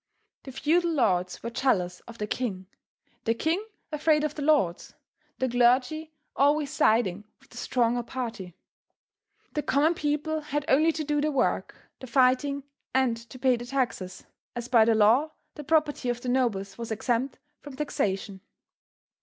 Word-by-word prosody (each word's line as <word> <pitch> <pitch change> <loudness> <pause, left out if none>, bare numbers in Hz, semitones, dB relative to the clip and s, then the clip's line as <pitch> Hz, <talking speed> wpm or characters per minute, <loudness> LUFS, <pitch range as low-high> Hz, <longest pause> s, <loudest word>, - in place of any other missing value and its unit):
The 270 - -7
feudal 335 +6 +1
lords 185 - 0
were 235 - -4
jealous 185 -9 0
of 230 - -11
the 210 - -2
king, 205 -4 -3 0.6
the 230 - +2
king 330 - 0 0.3
afraid 300 0 +2
of 305 -1 -1
the 300 - -6
lords, 285 - +1 0.4
the 260 - 0
clergy 255 +6 +2 0.2
always 290 +1 +2
siding 215 -8 +2 0.2
with 270 - -25
the - - -12
stronger 240 -1 +1
party. 230 -8 -6 1.0
The 300 - 0
common 295 +4 +2
people 310 -1 -1
had 295 -1 -3
only 310 +5 +4
to 315 -1 -4
do 295 0 0
the 305 +1 +1
work, 270 -3 0 0.2
the 260 - -9
fighting, 265 +3 +2 0.3
and 260 -3 +3
to 255 - -10
pay 255 -1 +2
the 240 - -7
taxes, 245 -8 -3 0.3
as 240 0 -4
by 230 -3 +5
the 225 0 +3
law 235 +9 +4 0.2
the 295 - -8
property 300 -4 +1
of 240 0 -1
the 250 - -3
nobles 220 -6 0
was 230 - -5
exempt 240 +4 -1 0.2
from 285 -2 -10
taxation. 195 -9 -2
260 Hz, 160 wpm, -27 LUFS, 230-295 Hz, 1.0 s, by